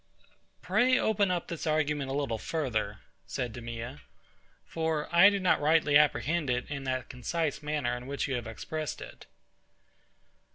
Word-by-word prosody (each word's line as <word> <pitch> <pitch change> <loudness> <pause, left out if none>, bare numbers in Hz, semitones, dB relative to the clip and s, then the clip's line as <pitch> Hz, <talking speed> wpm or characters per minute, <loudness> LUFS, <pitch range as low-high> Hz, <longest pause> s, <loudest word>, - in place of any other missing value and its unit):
Pray 255 +1 +3
open 205 -4 +2
up 175 -2 -1
this 170 -2 -5
argument 150 -3 0
a 135 - -2
little 135 -6 -1
further, 110 -8 -2 0.3
said 120 -3 -3
DEMEA, 120 +3 -6 0.6
for 160 -2 -1
I 180 +4 +9
do 200 -1 -1
not 185 -5 +2
rightly 150 -1 +3
apprehend 150 +2 +3
it 125 0 0
in 140 -2 -4
that 130 -1 -2
concise 150 +5 -2
manner 150 -5 -1
in 125 +1 -8
which 140 0 -2
you 135 - -2
have 120 -3 -3
expressed 155 +7 -5
it. - - -11
145 Hz, 155 wpm, -30 LUFS, 125-160 Hz, 0.6 s, I